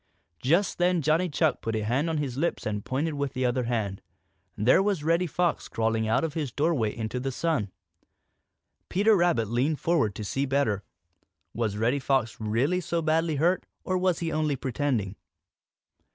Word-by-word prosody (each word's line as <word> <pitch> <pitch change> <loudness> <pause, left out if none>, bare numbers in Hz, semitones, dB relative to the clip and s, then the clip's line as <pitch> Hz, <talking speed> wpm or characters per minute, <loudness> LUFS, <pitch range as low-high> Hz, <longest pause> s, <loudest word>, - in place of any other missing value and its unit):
Just 170 +10 +2
then 175 -2 +2
Johnny 160 +5 +2
Chuck 155 0 +1
put 115 0 -2
a 110 - -1
hand 130 +9 0
on 160 - -1
his 140 -5 -2
lips 165 +6 -1
and 105 -1 -2
pointed 150 +5 -1
with 140 -2 -2
the 130 0 -1
other 125 0 0
hand. 110 -5 -2 0.6
There 120 - +4
was 195 -6 0
Reddy 170 +3 +2
Fox 175 +2 0
crawling 110 0 0
out 115 +8 +2
of 160 -3 -2
his 150 -6 -3
doorway 145 -7 0
into 115 +2 -3
the 135 +1 -2
sun. 130 - -1 1.2
Peter 205 +4 +4
Rabbit 170 - +2
leaned 130 +7 0
forward 160 - +1
to 105 - -5
see 135 +7 -1
better. 130 -7 +1 0.7
Was 110 -3 -1
Reddy 120 +6 +1
Fox 130 -4 0
really 125 +12 +1
so 170 -1 -2
badly 160 0 +1
hurt, 170 +6 +1 0.2
or 185 - -1
was 185 -1 +2
he 165 -1 -2
only 155 -2 0
pretending? 125 -7 -2
140 Hz, 175 wpm, -27 LUFS, 115-165 Hz, 1.2 s, There